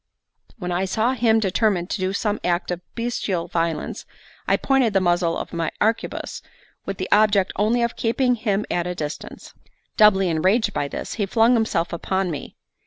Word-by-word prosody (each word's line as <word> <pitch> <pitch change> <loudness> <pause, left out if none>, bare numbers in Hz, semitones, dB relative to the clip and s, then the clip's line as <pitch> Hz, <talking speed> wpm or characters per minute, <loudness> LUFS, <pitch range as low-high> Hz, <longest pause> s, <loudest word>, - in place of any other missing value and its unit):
When 180 -5 -4
I 180 +2 0
saw 220 +6 +1
him 230 -3 +3
determined 195 -3 0
to - - -2
do 185 0 0
some 210 +1 -1
act 175 0 0
of 180 0 -3
bestial 230 -7 -2
violence, 165 -1 -2 0.4
I - - +3
pointed 265 -5 +2
the 195 - +4
muzzle 175 -2 +1
of - - -6
my 165 -1 -1
arquebuse, 225 +2 -1 0.5
with 195 -1 -3
the 185 - -3
object 205 -2 +4
only 225 +4 +2
of 235 - -1
keeping 250 +2 +1
him 210 -3 -1
at 175 0 0
a 180 - -3
distance. 150 -2 -7 0.4
Doubly 195 -3 +5
enraged 185 +8 +2
by 145 - -1
this, - - -5
he 205 -3 -2
flung 225 +4 +4
himself 220 -8 0
upon 190 +1 -1
me. 145 - -7
195 Hz, 175 wpm, -22 LUFS, 175-225 Hz, 0.5 s, Doubly